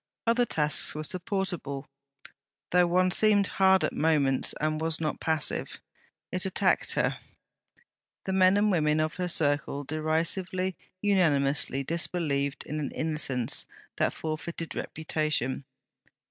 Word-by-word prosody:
Other 235 +1 +2
tasks 150 -6 +3
were 155 - -4
supportable, 180 -6 -3 0.9
though 180 0 +4
one 185 +1 +2
seemed 205 0 +4
hard 190 -1 +3
at - - 0
moments 145 -4 +2
and 155 0 -1
was 160 0 -1
not 155 -2 -2
passive; 160 -2 -1 0.5
it 185 - -2
attacked 190 0 +1
her. - - 0 1.1
The 190 - -2
men 190 +1 +5
and 210 0 +3
women 155 -3 +2
of 155 +1 -1
her 180 -1 -1
circle 145 -3 0
derisively, 170 +5 -1 0.3
unanimously, 145 -8 +2
disbelieved 145 -3 -1
in 155 +1 -4
an 140 -3 -3
innocence 150 -6 -1 0.3
that - - +1
forfeited 160 +1 -5
reputation. 155 -4 -2
160 Hz, 120 wpm, -28 LUFS, 150-185 Hz, 1.1 s, men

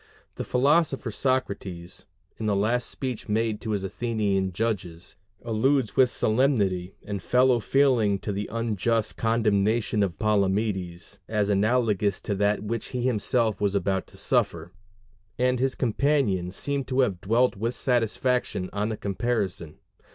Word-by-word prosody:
The - - -5
philosopher 135 -1 +2
Socrates, 100 -9 -2 0.3
in 110 - -3
the 105 - +2
last 115 +5 0
speech 130 -6 -5
made 110 0 0
to 110 - -5
his 100 -2 -1
Athenian 100 -2 -1
judges, 90 -4 -3 0.3
alludes 120 +1 +1
with 130 -1 +5
solemnity 105 -8 +1
and 100 -2 -5
fellow 125 +7 +3
feeling 115 -3 +2
to 105 - -3
the 100 +1 -4
unjust 115 -1 -1
condemnation 110 -1 +1
of 95 -5 -1
Palamedes 100 -3 -1
as 105 -2 0
analogous 105 -1 +1
to 105 - -2
that 100 +1 +1
which 115 +1 -3
he 125 -1 -3
himself 115 -2 +1
was 100 -1 +1
about 95 -1 0
to - - -15
suffer; 85 +1 0 0.7
and 125 0 +1
his 135 +1 0
companions 115 -8 0
seem 140 -1 -1
to 130 0 +1
have 100 -9 0
dwelt 120 +5 +2
with 115 +5 -2
satisfaction 125 -4 0
on 105 +2 -1
the 110 - -3
comparison. 100 -6 -2
110 Hz, 140 wpm, -26 LUFS, 100-125 Hz, 0.7 s, with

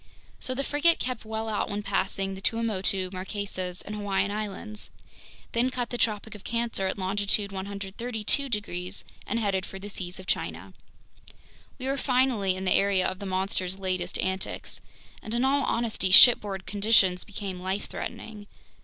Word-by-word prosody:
So 255 - -2
the 275 - -1
frigate 295 +4 +3
kept 250 -3 -3
well 220 0 -3
out 215 -1 -1
when 205 +1 -3
passing 195 -1 -1
the 190 - -8
Tuamotu, 195 -4 0
Marquesas, 185 -1 -4
and 210 - -6
Hawaiian 200 -1 0
Islands, 210 0 -5 0.6
then 240 +2 +2
cut 250 -2 -3
the 245 - -2
Tropic 215 0 0
of 210 - -10
Cancer 230 -4 0
at 190 - -2
longitude 200 +1 +1
132 205 +7 -2
degrees 195 -4 -3 0.2
and 230 - 0
headed 195 -4 +1
for 195 - -8
the 200 +2 -7
seas 180 -1 -4
of 185 - -9
China. 85 - -2 1.0
We 255 - -6
were 270 +1 0
finally 250 -8 +2
in 190 +1 -4
the 185 - +4
area 195 -2 +3
of 185 - -4
the 200 - -5
monster's 190 0 -1
latest 185 -2 -2
antics! 190 0 -3 0.4
And 220 +2 -4
in 245 +2 +2
all 280 +1 +3
honesty, 230 -5 +1
shipboard 195 -2 +8
conditions 200 -3 +4
became 195 -3 -6
life 190 +2 -2
threatening. 210 -2 -7
200 Hz, 160 wpm, -28 LUFS, 190-225 Hz, 1.0 s, shipboard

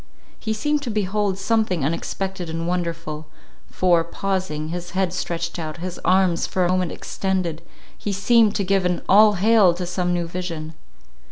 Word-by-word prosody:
He 220 - -3
seemed 295 +7 0
to 270 - -4
behold 205 -2 0
something 195 -6 +1
unexpected 180 +3 -3
and 165 +1 -3
wonderful; 165 -3 -3 0.4
for, 175 -2 +3
pausing, 170 -3 -3
his 175 +1 -5
head 190 -2 +1
stretched 170 -1 -3
out, 155 -1 -5
his 180 +1 -6
arms 185 -2 +3
for 185 -1 0
a - - +1
moment 185 -2 +1
extended, 185 -4 -2 0.3
he 205 - -4
seemed 215 +2 +3
to 200 - 0
give 195 0 +2
an 180 -1 0
All 210 +2 +7
Hail! 200 -2 +4
to 180 - -4
some 180 0 -1
new 175 -1 -1
vision. 165 -3 -5
180 Hz, 165 wpm, -22 LUFS, 170-195 Hz, 0.4 s, All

